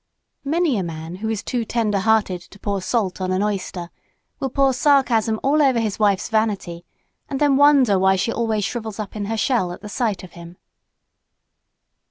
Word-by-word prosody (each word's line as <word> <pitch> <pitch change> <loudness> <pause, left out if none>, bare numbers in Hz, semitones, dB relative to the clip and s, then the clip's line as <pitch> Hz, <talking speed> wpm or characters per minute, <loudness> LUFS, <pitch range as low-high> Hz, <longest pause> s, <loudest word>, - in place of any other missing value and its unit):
Many 300 - +1
a - - -1
man 165 +1 -6
who 220 +3 -4
is 220 -1 -2
too 245 -2 -2
tender 220 -3 0
hearted 210 -4 +1
to 195 - -16
pour 200 -1 -3
salt 195 -2 -1
on 185 0 -1
an 185 +2 +1
oyster 185 -4 -3 0.5
will 270 - -2
pour 270 +1 +2
sarcasm 245 -5 +2
all 295 +3 +3
over 265 -4 +3
his 220 -3 -2
wife's 200 -3 +2
vanity 205 -6 -1 0.5
and 270 - -3
then 290 -2 +3
wonder 275 -8 +5
why 190 0 +4
she 190 +5 -1
always 225 -3 -1
shrivels 220 -4 -5
up 210 -1 -6
in 205 -1 -3
her 225 +2 -3
shell 220 -5 +1
at 175 - -9
the 210 - -8
sight 215 -3 -2
of 180 - -11
him. 170 +1 -12
215 Hz, 190 wpm, -21 LUFS, 190-245 Hz, 0.5 s, wonder